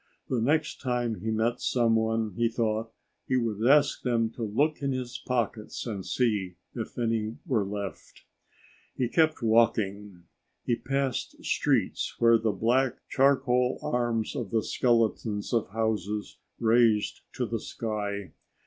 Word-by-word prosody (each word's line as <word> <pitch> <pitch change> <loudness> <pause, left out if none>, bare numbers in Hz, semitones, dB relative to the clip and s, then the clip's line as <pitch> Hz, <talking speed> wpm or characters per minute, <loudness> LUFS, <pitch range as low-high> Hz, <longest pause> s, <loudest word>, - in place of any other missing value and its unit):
The 125 -3 0
next 150 +6 +1
time 120 -4 -1
he 110 - -3
met 110 +2 0
someone, 115 -3 +1
he 120 +2 +2
thought, 115 -1 -1 0.4
he 130 - +2
would 110 -3 -1
ask 145 +1 +4
them 115 -3 +1
to 120 - -10
look 140 +9 0
in 140 -1 0
his 125 -1 -4
pockets 115 -3 -2
and 105 -5 -4
see 105 -6 0 0.2
if 115 -3 -6
any 115 -2 -1
were 125 - +1
left. 100 -1 -6 0.7
He 125 - 0
kept 155 -1 +2
walking. 105 -4 +1 0.4
He 120 - +2
passed 135 +1 -2
streets - - 0
where 115 -1 +5
the 110 -1 +1
black, 125 +4 +1
charcoal 130 -2 +3
arms 120 -2 -1
of 115 -6 -3
the 110 0 +1
skeletons 115 -3 0
of 115 -5 +1
houses 105 -1 -2 0.2
raised 115 -2 +3
to - - -1
the - - -2
sky. 105 -3 -4
115 Hz, 140 wpm, -28 LUFS, 110-125 Hz, 0.7 s, where